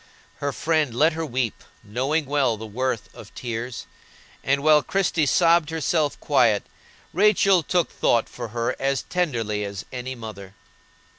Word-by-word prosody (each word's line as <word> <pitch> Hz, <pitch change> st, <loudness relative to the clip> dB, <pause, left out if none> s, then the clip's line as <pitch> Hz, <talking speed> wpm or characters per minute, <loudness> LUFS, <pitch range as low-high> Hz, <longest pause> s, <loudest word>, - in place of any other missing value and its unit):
Her 145 Hz, -, -2 dB
friend 155 Hz, -4 st, 0 dB
let 155 Hz, +5 st, +4 dB
her 165 Hz, +1 st, -3 dB
weep, 125 Hz, -6 st, -2 dB, 0.2 s
knowing 135 Hz, +9 st, -1 dB
well 135 Hz, -5 st, +1 dB
the 110 Hz, -, -7 dB
worth 115 Hz, 0 st, -3 dB
of -, -, -12 dB
tears, 120 Hz, 0 st, -5 dB, 0.6 s
and 140 Hz, +1 st, +1 dB
while 155 Hz, -1 st, +6 dB
Christie 175 Hz, -3 st, 0 dB
sobbed 170 Hz, 0 st, +4 dB
herself 160 Hz, -1 st, 0 dB
quiet, 120 Hz, -8 st, +3 dB, 0.5 s
Rachel 195 Hz, -1 st, +4 dB
took 175 Hz, +2 st, 0 dB
thought 115 Hz, -1 st, +1 dB
for 120 Hz, -1 st, -7 dB
her 115 Hz, +1 st, -2 dB
as 135 Hz, 0 st, 0 dB
tenderly 115 Hz, -12 st, -1 dB
as 100 Hz, 0 st, -6 dB
any 130 Hz, +1 st, -5 dB
mother. 100 Hz, -4 st, -9 dB
135 Hz, 145 wpm, -24 LUFS, 115-160 Hz, 0.6 s, while